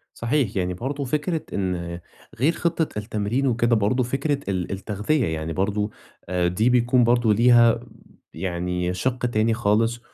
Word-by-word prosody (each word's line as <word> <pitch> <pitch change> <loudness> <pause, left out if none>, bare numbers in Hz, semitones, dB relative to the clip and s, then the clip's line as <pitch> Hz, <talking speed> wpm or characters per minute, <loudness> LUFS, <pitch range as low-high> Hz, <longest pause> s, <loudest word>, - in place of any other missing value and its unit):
صحيح 115 -3 0
يعني، 90 -1 -1
برضه 140 +8 -4
فكرة 150 +5 -1
إن 85 -3 -3 0.4
غير 140 +8 +3
خطّة 165 -8 -1
التمرين 110 +5 -1
وكده 120 -1 +2
برضه 110 +5 +1
فكرة 135 +4 -1
ال 90 -2 -2
التغذية، 105 +8 -1
يعني 80 0 -3
برضه 105 +3 -1 0.4
آآ، 90 -1 +1
دي 110 +7 +1
بيكون 125 0 +3
برضه 120 -2 +3
ليها 120 0 +5 0.5
يعني 90 0 -2
شِق 125 +6 -1
تاني 115 -1 +1
خالص، 115 +1 +1
115 Hz, 140 wpm, -23 LUFS, 95-125 Hz, 0.5 s, ليها